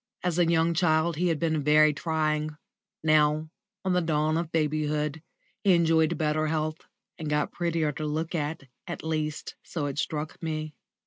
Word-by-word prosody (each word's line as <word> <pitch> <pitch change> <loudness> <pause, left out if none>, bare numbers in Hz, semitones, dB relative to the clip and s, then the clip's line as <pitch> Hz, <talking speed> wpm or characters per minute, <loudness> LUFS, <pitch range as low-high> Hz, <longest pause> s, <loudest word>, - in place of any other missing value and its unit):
As 180 -1 0
a 170 -1 +4
young 165 0 +3
child 160 -1 +2
he 180 +2 +1
had 165 -3 +1
been 160 -2 0
very 150 +1 +5
trying; 155 0 -1 0.5
now, 155 0 +3 0.3
on 190 - +2
the 180 - +3
dawn 155 -1 +1
of 165 0 -2
babyhood, 150 -1 0 0.4
he 190 -3 +5
enjoyed 165 -1 +3
better 155 0 +1
health 155 0 -1 0.4
and 155 -2 -4
got 150 0 0
prettier 165 -3 0
to 150 +1 -4
look 160 +3 -2
at, 155 -1 -2 0.3
at 175 - -5
least, 155 -1 -2
so 160 -4 -3
it 145 0 -3
struck 155 0 -3
me. 155 -2 -3
155 Hz, 170 wpm, -27 LUFS, 150-165 Hz, 0.5 s, very